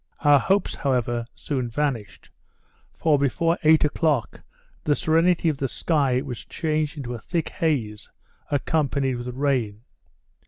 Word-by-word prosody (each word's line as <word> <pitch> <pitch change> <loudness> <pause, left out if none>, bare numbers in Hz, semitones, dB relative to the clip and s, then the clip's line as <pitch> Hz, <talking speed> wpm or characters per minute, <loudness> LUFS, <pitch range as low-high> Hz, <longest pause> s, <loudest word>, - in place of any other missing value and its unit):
Our 145 -1 +6
hopes, 195 +7 +1
however, 120 -4 -1
soon 130 -5 -3
vanished; 115 -8 -3 0.6
for 150 -3 +2
before 165 +5 +1
eight 155 0 +5
o'clock, 150 -4 0 0.4
the 145 - +2
serenity 165 +3 +2
of 155 -3 +1
the 135 - -1
sky 135 -3 +1
was 130 -5 -6
changed 155 -1 -2
into 125 -4 -5
a 120 - -6
thick 170 +3 -2
haze, 120 -10 -2 0.4
accompanied 140 -3 0
with 120 +1 -6
rain. 125 -5 -1
140 Hz, 130 wpm, -24 LUFS, 125-155 Hz, 0.6 s, Our